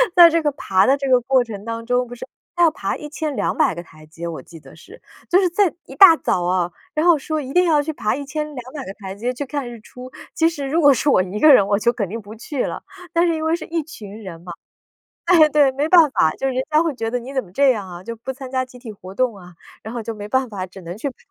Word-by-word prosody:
那 345 -1 +9
这 335 0 +1
个 295 -2 0
爬 190 -9 +2
的 270 - +4
这 275 -1 -3
个 255 - +5
过 255 +1 +2
程 210 -3 -9
当 230 0 -5
中， 245 +1 0
不 245 - -9
是 - - -9 0.3
它 345 - +3
要 330 - +5
爬 195 - -3
1200 300 - -1
个 170 - -7
台 155 -2 -17
阶 165 +2 -8
我 165 - -6
记 165 -1 -14
得 - - -16
是。 - - -15 0.3
就 360 - +5
是 370 -2 +2
在 370 0 +1
一 270 - -12
大 330 +2 +9
早 180 - -1
哦， 180 -1 0 0.2
然 305 +2 0
后 345 -3 +6
说 310 +2 -3
一 270 -1 -7
定 360 0 +4
要 305 -3 +3
去 315 - -3
爬 215 -3 -1
1200 280 -1 -6
个 195 - -7
台 195 -2 -8
阶 240 +4 -3
去 285 +3 -5
看 275 -2 -4
日 235 -1 -10
出。 250 +3 -12 0.2
其 325 0 +2
实 285 -4 -5
如 320 +5 +1
果 285 -1 +7
是 285 +4 0
我 185 - +4
一 190 +3 -5
个 305 +2 +7
人， 200 -5 +5
我 200 0 +2
就 235 +2 +2
肯 205 -4 -2
定 225 +2 -5
不 205 +2 -11
去 250 +4 -4
了， - - -6 0.3
但 340 +1 +3
是 335 - +1
因 315 - -4
为 320 +1 +1
是 345 - -7
一 330 -1 -2
群 215 -9 -11
人 170 -4 -9
嘛。 175 0 -8 0.7
诶， 335 -3 +6
对， 290 -2 +4
没 285 +4 -1
办 330 -4 +6
法， 160 -10 +2
就 270 - -3
是 265 - -2
人 260 - 0
家 305 +1 +4
会 330 -2 -1
觉 225 -3 -3
得 250 - -1
你 255 +3 -9
怎 260 -2 -1
么 180 - -18
这 280 +4 +4
样 210 -6 -2
啊， 175 0 -9
就 230 +3 -7
不 240 +4 -6
参 265 -1 -9
加 260 0 0
集 255 -1 -15
体 235 -3 -8
活 190 -2 -12
动 250 -1 0
啊。 180 -2 -14 0.3
然 220 +2 -8
后 235 - -4
就 230 - -5
没 205 -1 -8
办 260 +3 0
法， 190 -3 -5
只 190 +1 -13
能 175 +2 -8
去 280 - -2
爬。 255 - -11
255 Hz, 300 characters per minute, -20 LUFS, 205-300 Hz, 0.7 s, 那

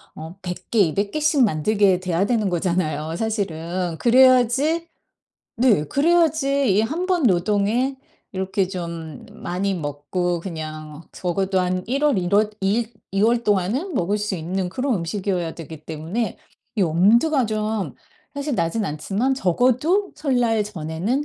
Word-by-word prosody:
어 160 +3 -8
100 180 0 -7
개, 230 - +2
200 200 +2 +2
개씩 305 -3 +2
만들게 200 0 +2
돼야 185 0 0
되는 215 -3 +1
거잖아요 165 -3 -1
사실은. 180 -5 -2
그래야지 260 +6 +4 0.7
네 230 -10 +3
그래야지 280 - +2
이 - - +5
1 320 +11 -2
번 360 -5 +1
노동에 210 +6 +2 0.4
이렇게 190 0 -1
좀 170 -5 -6 0.2
많이 190 +3 -1
먹고 165 +3 -2
그냥 155 -3 -7
적어도 190 +1 -1
한 180 0 -1
1 270 +5 -1
월, 290 -8 +3
1 175 0 -2
월 210 +1 +3
이일 215 +4 0 0.2
2 195 +1 +1
월 235 +2 +2
동안은 215 - 0
먹을 200 -1 0
수 210 -1 -2
있는 180 +3 -2
그런 260 +5 -1
음식이어야 180 -1 -2
되기 160 -2 -10
때문에 165 +8 -3 0.4
이 205 - +3
엄두가 225 - +3
좀 215 -1 -2 0.4
사실 285 0 -2
나진 170 +6 0
않지만 195 - -1
적어도 260 - +2
설날 240 -7 +1
전에는 195 - -2
200 Hz, 255 characters per minute, -22 LUFS, 175-245 Hz, 0.7 s, 이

